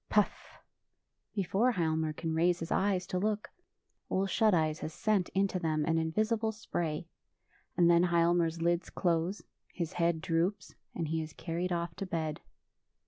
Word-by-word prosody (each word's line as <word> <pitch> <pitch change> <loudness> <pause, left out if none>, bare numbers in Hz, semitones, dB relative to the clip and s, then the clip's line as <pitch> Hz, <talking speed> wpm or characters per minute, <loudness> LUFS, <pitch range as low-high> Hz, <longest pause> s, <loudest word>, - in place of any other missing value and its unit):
Puff! 210 -2 0 0.8
Before 200 +5 +2
Hialmar 160 -4 0
can 160 0 -3
raise 170 +2 +3
his 165 -1 -6
eyes 190 -2 +1
to 180 - -2
look. 210 +1 -1 0.6
Ole 190 +1 +1
Shut 215 +2 +3
Eyes 155 -3 +1
has 155 - -6
sent 210 -4 +1
into 195 -1 +1
them 155 -3 0
an 165 0 +2
invisible 215 +7 0
spray; 170 -7 -3 0.7
and 175 -1 +5
then 170 +1 +5
Hialmar's 170 -1 +2
lids 170 +1 +1
close, 175 +2 0 0.3
his 170 0 -4
head 170 -2 +1
droops, 165 +5 -1 0.2
and 165 -3 -2
he 160 0 0
is 155 -1 -7
carried 175 +3 -3
off 170 0 -1
to 195 - -4
bed. 160 -3 -2
170 Hz, 155 wpm, -31 LUFS, 165-190 Hz, 0.8 s, and